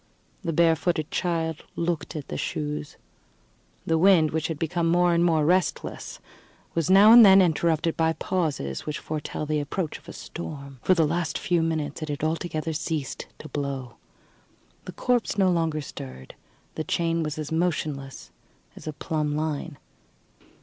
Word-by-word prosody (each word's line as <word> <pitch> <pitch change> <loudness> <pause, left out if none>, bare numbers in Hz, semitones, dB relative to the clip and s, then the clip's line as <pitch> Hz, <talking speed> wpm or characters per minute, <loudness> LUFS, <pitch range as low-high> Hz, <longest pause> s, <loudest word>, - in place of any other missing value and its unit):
The 170 -4 -2
barefooted 165 0 +2
child 165 -3 -1
looked 170 -1 -2
at 150 -3 -5
the - - -4
shoes. 150 0 -4 0.9
The 160 0 +2
wind, 170 -4 +5
which 160 0 -1
had 160 - -4
become 165 +2 -1
more 175 0 +4
and 170 0 +3
more 160 -3 +3
restless, 180 +3 -1 0.5
was 165 -1 0
now 200 +3 +8
and 235 0 +10
then 195 -2 +8
interrupted 165 -2 +2
by 160 0 +2
those - - -22
pauses 150 - -2
which 150 - -2
foretell 155 0 -4
the 150 0 0
approach 155 +3 -3
of - - -15
a - - -8
storm. 140 -5 -8
For 185 - +3
the 165 -2 +3
last 160 0 -1
few 175 -2 +1
minutes 155 -2 -2
it 155 - -4
had 145 0 -4
altogether 160 0 -2
ceased 155 -3 -3
to 155 - -10
blow. 135 -4 -4 0.9
The - - -6
corpse 245 -4 0
no 190 -2 +4
longer 165 -3 0
stirred; 65 - -9 0.4
the 155 - -3
chain 165 +1 0
was 155 -1 -3
as 155 -1 -5
motionless 155 -5 -2 0.4
as - - -11
a 155 - -3
plumb 150 0 -2
line. 155 0 -3
160 Hz, 165 wpm, -26 LUFS, 150-170 Hz, 0.9 s, and